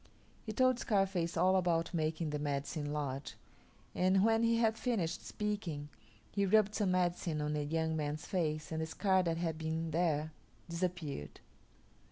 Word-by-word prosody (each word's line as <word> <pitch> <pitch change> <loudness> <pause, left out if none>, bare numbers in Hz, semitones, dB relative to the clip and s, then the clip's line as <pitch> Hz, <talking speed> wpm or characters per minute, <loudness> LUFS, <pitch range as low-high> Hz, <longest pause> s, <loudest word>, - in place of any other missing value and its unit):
He 220 - -4
told 255 +2 +3
Scarface 195 -6 +1
all 185 +1 +4
about 175 -2 +1
making 160 -1 -1
the 150 - -2
Medicine 145 +1 -2
Lodge, 140 -2 -3 0.6
and 190 +2 +3
when 225 0 +4
he 230 0 +3
had 225 -1 +3
finished 195 -10 -1
speaking, 180 -9 -3 0.4
he 200 - 0
rubbed 210 +1 +4
some 205 -3 +1
medicine 175 -3 0
on 150 0 -1
the 150 -1 0
young 160 +2 0
man's 150 0 -2
face 155 -4 -1
and 160 0 -1
the 160 - -2
scar 190 +3 +2
that 165 -2 0
had 165 -2 -2
been 160 +1 -2
there 155 -2 +1 0.4
disappeared. 170 - -3
165 Hz, 160 wpm, -34 LUFS, 155-190 Hz, 0.6 s, all